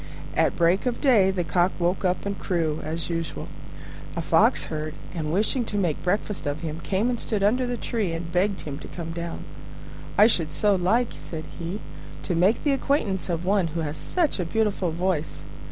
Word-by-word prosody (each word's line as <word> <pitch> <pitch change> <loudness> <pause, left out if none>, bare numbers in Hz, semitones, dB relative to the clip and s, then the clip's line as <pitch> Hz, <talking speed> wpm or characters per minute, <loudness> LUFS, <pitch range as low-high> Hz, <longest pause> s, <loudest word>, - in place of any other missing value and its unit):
At - - +3
break 175 +7 +3
of 245 - -1
day 225 -9 +5
the 190 -2 0
Cock 175 +2 +2
woke 180 +3 0
up 180 +1 0
and 200 -1 -3
crew, 160 -4 0
as 165 +2 -3
usual. 165 -1 -3 0.7
A - - -1
Fox - - +4
heard, 155 0 -4 0.2
and, 155 -3 -2
wishing 215 +7 +2
to 210 - -3
make 175 -7 +1
a - - -13
breakfast 195 -2 -1
of 145 +1 -2
him, 160 -1 -4
came 195 +6 0
and 240 - -2
stood 210 -3 -1
under 250 +5 +3
the 245 0 -2
tree 220 -6 -1
and 165 0 -4
begged 190 +3 +1
him 145 -1 -6
to - - -9
come 165 -2 -6
down. 170 0 -5 0.7
"I 210 - +8
should 165 -9 +2
so 210 -1 +3
like," 205 +6 +2
said 160 -2 -7 0.2
he, 175 +5 -4 0.4
"to 180 - -1
make 185 +7 +3
the 290 - +3
acquaintance 230 -10 0
of 170 0 -1
one 195 -2 +3
who 165 +1 -3
has 150 -1 -3
such 330 - 0
a - - +1
beautiful 205 -1 +1
voice." 165 -3 -1
180 Hz, 200 wpm, -25 LUFS, 165-210 Hz, 0.7 s, I